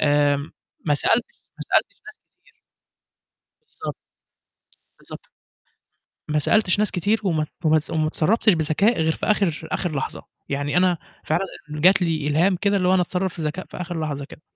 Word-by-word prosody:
آمم 145 -1 +2 0.3
ما 145 - +3
سألتش 145 - +2 0.2
ما - - -5
سألتش - - +2
ناس - - -12 0.2
كتير. - - -27 1.2
بالضبط. - - -6 1.0
بالضبط. - - -12 1.0
ما 150 0 +1
سألتش 205 +5 +2
ناس 210 -1 +2
كتير 200 +5 +1
وما 165 -6 +1
ت - - -6 0.2
وما 155 0 +5
تص 155 - -11
وما 155 -1 0
اتصرّفتش 200 +7 +2
بذكاء 165 +7 +2
غير 160 0 +2
في - - -4
آخِر 180 -7 0
آخِر 175 -5 -2
لحظة، 135 - -4 0.2
يعني 145 +1 -1
أنا 180 -1 +3 0.3
فعلًا 170 +5 0 0.2
جات 175 +6 +4
لي 160 -4 0
إلهام 170 +6 +3
كده 200 +2 +1
اللي 180 -2 +1
هو 185 - +4
أنا 185 - +4
أتصرّف 180 0 -2
في 170 - -7
ذكاء 155 +4 -3
في - - -11
آخِر 175 -1 -4
لحظة 145 -3 -3
كده، 150 - -14
165 Hz, 175 wpm, -23 LUFS, 150-185 Hz, 1.2 s, وما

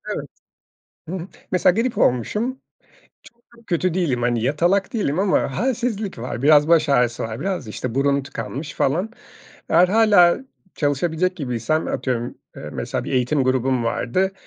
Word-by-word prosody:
Evet. - - -5 0.8
Hımm, 185 0 -5 0.2
mesela 180 -1 +4
grip 245 0 -2
olmuşum, 210 - +1
çok 265 - -30 0.8
çok 230 - -26
kötü 175 0 0
değilim. 145 -10 0
Hani, 120 -2 +1
yatalak 175 - +1
değilim 180 -9 -1
ama 190 -8 +1
halsizlik 230 - -2
var. 120 0 -5
Biraz 150 +1 +5
baş 165 -2 +4
ağrısı 125 -4 +2
var 110 +2 -5
biraz, 185 - -3
işte, 115 +2 -5
burun 140 +1 +2
tıkanmış 135 +3 -6
falan. 180 +11 0 0.6
Eğer 175 +2 +5
hâlâ 205 -4 +5 0.4
çalışabilecek 160 +5 0
gibiysem 130 +2 -1
atıyorum, 120 -2 -2 0.2
eee, - - -8
mesela - - -3
bir - - -5
eğitim 130 +2 +1
grubum 130 -1 +1
vardı. 185 +12 0
150 Hz, 145 wpm, -21 LUFS, 125-185 Hz, 0.8 s, Biraz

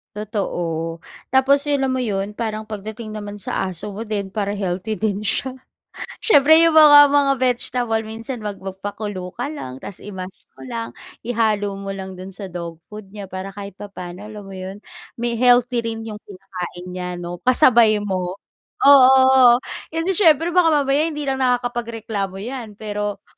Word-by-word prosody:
Totoo, 170 -6 -3 0.3
tapos 270 +2 +4
'yun 290 -2 +1
alam - - -1
mo 255 - -1
'yun, 205 -2 -3
parang 220 -1 -4
pagdating 215 +1 -7
naman 205 -1 -7
sa 190 -1 -2
aso 200 +3 -7
mo 220 - -4
din 210 -3 -3
para 200 0 -3
healthy 200 +1 -3
din 210 -1 -1
siya. 260 +5 0 0.6
Siyempre, 315 - +6
yung 330 -1 +4
mga, 290 -2 +9
mga 280 -1 +3
vegetable, 245 -2 0
minsan 225 +2 -7
mag 205 -2 -5
magpakulo 195 -1 -6
ka 280 - -4
lang. 135 - -7
Tas 200 - -9
i-mash 190 -2 -7 0.2
mo - - -10
lang, 230 -2 -5 0.3
ihalo 215 -4 0
mo 195 - -8
lang 190 -1 -8
do'n 190 0 -8
sa 195 -3 -8
dog 170 -2 -7
food 210 -1 -11
niya 200 -3 -8
para 190 +1 -5
kahit 200 -2 -9
papano, 195 -1 -8
alam 210 -1 -9
mo 195 - -11
'yun, 190 +2 -8 0.3
may 235 -1 -2
healthy 245 0 +4
rin 225 -1 -4
'yung 215 -2 -7
kinakain 185 -3 -8
niya, 180 0 -5
'no? 175 0 -6
Kasabay 235 -5 +4
mo. 185 -2 -2 0.5
Oo, 260 -2 +7 0.3
kasi 330 +4 -1
siyempre, 330 -3 +4
baka 355 -1 +4 0.2
mamaya 280 +4 +2
hindi 300 -2 -4
lang 270 -1 -1
nakakapagreklamo 235 -5 -2
'yan. 240 -4 -7
Pero, 205 -1 -4
215 Hz, 165 wpm, -21 LUFS, 195-250 Hz, 0.6 s, mga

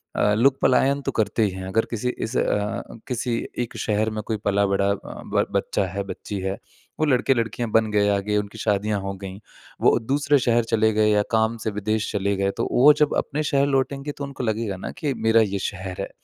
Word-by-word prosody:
अ, 105 - +3
लोग 130 +4 +3
पलायन 135 +2 +3
तो - - -2
करते 110 +1 +1
ही 105 - +2
हैं, 95 0 -7
अगर 110 +4 +1
किसी 120 +2 -1 0.2
इस 110 +3 -6
अ, - - +3 0.6
किसी 120 -1 -1 0.2
एक 120 -1 -3
शहर 110 0 0
में 110 0 -3
कोई 110 -2 -1
पला-बढ़ा 100 0 +2
अ, - - +1 0.4
ब - - +3
बच्चा 100 - 0
है, 100 +2 -4
बच्ची 100 0 -6
है। 95 +1 -2 0.4
वो 155 - +3
लड़के-लड़कियाँ 120 -4 +1
बन 110 -1 +3
गए 105 -1 +3
आगे, 105 +1 0
उनकी 105 +1 -4
शादियाँ 105 0 0
हो 95 0 -4
गईं। 95 0 -7 0.4
वो - - +5
दूसरे 140 +4 +2
शहर 120 -1 +2
चले 110 0 +4
गए 105 0 +3
या 105 0 +4
काम 110 +1 +2
से 110 - 0
विदेश 110 +1 -1
चले 100 0 0
गए, 100 0 +1
तो - - -2
वो 145 +4 +7
जब 150 - +3
अपने 150 +2 -1
शहर 140 -1 +2
लौटेंगे 140 +1 -1
तो 140 - -8
उनको 140 -2 -5
लगेगा 110 -3 -1
ना - - -6
कि 150 -5 -1
मेरा 110 -2 +3
ये 100 -2 0
शहर 95 -2 -4
है - - -4
110 Hz, 215 wpm, -23 LUFS, 100-125 Hz, 0.6 s, वो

